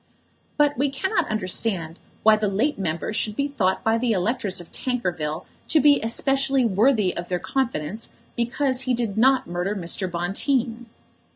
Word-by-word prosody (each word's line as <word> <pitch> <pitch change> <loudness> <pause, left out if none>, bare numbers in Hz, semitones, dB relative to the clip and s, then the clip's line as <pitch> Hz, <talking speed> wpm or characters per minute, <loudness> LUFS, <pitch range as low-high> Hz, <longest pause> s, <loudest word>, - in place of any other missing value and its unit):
But 290 -1 +3
we 285 +1 +2
cannot 350 +4 -1
understand 185 -4 -2 0.2
why 220 0 +7
the 215 0 -1
late 220 +9 0
member 170 +2 -2
should 215 -1 -1
be 280 +3 0
thought 205 -10 0
by 225 +1 +2
the 235 -1 +1
electors 200 0 -1
of 175 - -12
Tankerville 175 -10 -2 0.2
to 315 - +4
be 290 -1 +5
especially 270 +3 +1
worthy 215 -1 +2
of 175 +1 -5
their 180 - -1
confidence 220 - -2 0.2
because 255 +2 0
he 255 -1 0
did 230 -4 -2
not 260 +4 +4
murder 180 +4 -2
Mr. 185 0 -1
Bonteen. 230 +7 -1
225 Hz, 160 wpm, -24 LUFS, 185-265 Hz, 0.2 s, why